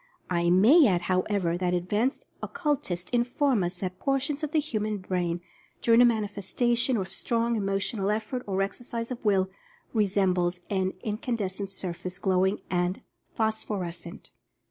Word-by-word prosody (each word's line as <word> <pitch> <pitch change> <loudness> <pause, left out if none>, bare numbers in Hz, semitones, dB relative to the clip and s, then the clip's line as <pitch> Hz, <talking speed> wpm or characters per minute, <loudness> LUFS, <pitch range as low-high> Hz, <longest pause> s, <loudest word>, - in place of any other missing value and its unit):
I 170 -1 +2
may 240 - +7
add, 180 -4 +2
however, 185 -1 0
that 180 -1 +1
ad 175 0 -2
vanced 225 +8 0 0.2
occultists 260 - -2
inform 245 -1 +2
us 175 +1 -4
that 185 -1 -4
portions 280 +2 0
of 300 - -2
the 315 - +3
hu 285 -7 -2
man 210 0 -1
brain, 175 -2 -2 0.4
during 230 +1 +6
a - - +8
manifestation 235 +3 +1
of 190 -2 -3
strong 235 0 0
emo 195 -2 0
tional 200 0 -1
effort, 220 +4 -2
or 195 0 +1
exercise 230 +3 -5
of 250 0 -5
Will, 190 -3 +2 0.4
resembles 185 -4 +2
an 190 -1 +1
incan 220 +3 -2
descent 195 -2 -3
surface, 180 -1 -4
glowing 190 +1 +1
and 180 +1 -1 0.3
phosphorescent. 190 -6 -3
200 Hz, 150 wpm, -27 LUFS, 185-235 Hz, 0.4 s, a